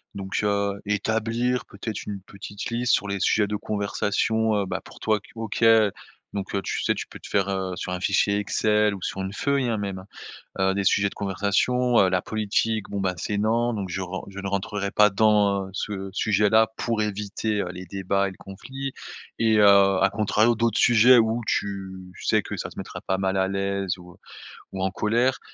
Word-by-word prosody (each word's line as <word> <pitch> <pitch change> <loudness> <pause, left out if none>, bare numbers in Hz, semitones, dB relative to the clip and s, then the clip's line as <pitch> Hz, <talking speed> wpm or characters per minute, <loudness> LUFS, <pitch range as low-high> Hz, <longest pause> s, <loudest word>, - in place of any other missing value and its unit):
Donc 95 0 -3
heu, 100 -1 0
établir 115 +4 0
peut-être 105 +2 -6
une 100 -1 -4
petite 100 +1 -8
liste 120 +1 +1
sur 100 - +1
les 100 0 -2
sujets 105 -2 +3
de 105 - -2
conversation, 105 +2 0
heu, 100 - 0
bah, - - -4
pour - - -14
toi 110 -1 +1
que - - -19
OK, 115 0 -4 0.7
donc 100 0 -4
heu, 100 - 0
tu - - -3
sais, - - +1
tu - - -5
peux - - -12
te - - -11
faire, 100 -1 +1
heu, 95 -1 -2
sur 90 - -5
un 90 - -2
fichier 100 +2 +2
Excel 105 0 +1
ou 95 - -10
sur 95 - -4
une 95 +1 -4
feuille, 140 +3 0
hein, 115 -2 0
même, 100 -2 -5 0.5
heu, 95 0 +3
des 100 0 -1
sujets 100 +1 +3
de - - -13
conversation, 105 +5 +1
heu, 95 - +4
la 90 -1 +1
politique 110 +1 -1
bon, 100 - -3
bah, 95 -1 0
c'est 100 +5 -2
non, 115 +3 +1
donc 100 -3 -3
je 90 +2 -3
ren 95 +1 -5
je 100 0 -9
ne 100 - -4
rentrerai 100 +1 -2
pas 105 0 +5
dans, 100 -2 +2
ce 95 0 -4
sujet-là 105 +2 +3
pour 115 -2 -1
éviter, 105 0 -2
heu, 90 - -4
les 90 0 -8
débats 100 +2 -1
et - - -5
le 95 - -14
conflit 135 +8 -7 0.5
et 110 -1 +3
heu, - - +6 0.4
à 100 - +5
contrario, 110 +2 +2
d'autres 115 -1 +1
sujets, 120 +2 +6
où 115 +1 +2
tu 95 -2 -3
sais - - +2
que - - -6
ça - - -4
te - - -16
mettra - - -6
pas 95 - -1
mal 95 0 0
à 95 0 +2
l'aise 100 -1 -2
ou 90 -1 -14 0.5
ou 95 - -5
en 95 0 0
colère, 120 +7 +1
100 Hz, 205 wpm, -25 LUFS, 95-110 Hz, 0.7 s, heu